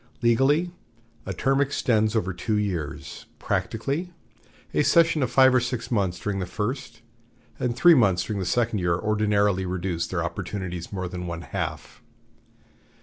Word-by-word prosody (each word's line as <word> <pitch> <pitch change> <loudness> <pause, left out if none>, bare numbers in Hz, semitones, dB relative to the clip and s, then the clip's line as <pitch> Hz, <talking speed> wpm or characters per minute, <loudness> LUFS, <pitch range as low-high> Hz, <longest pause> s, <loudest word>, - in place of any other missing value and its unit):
Legally, 135 +9 +3 0.6
a - - -2
term 135 +1 +2
extends 115 -6 +1
over 95 -4 0
two 105 +4 -1
years; 90 -8 -4
practically, 140 - -2 0.6
a - - +3
session 160 +2 +4
of 130 - +1
five 130 0 +5
or 125 - +5
six 120 -1 -4
months 95 -6 0
during 100 -1 -2
the 90 - -3
first, 115 +4 -4 0.6
and 120 -2 -1
three 175 +7 +7
months 100 - +3
during 105 -2 -3
the 95 - -2
second 115 -1 +1
year 90 -1 +1
ordinarily 105 -2 +1
reduce 90 -2 -2
their - - -2
opportunities 90 -4 -5
more 95 -2 -3
than 90 0 -6
one 85 0 -5
half. - - -5
105 Hz, 150 wpm, -25 LUFS, 95-130 Hz, 0.6 s, three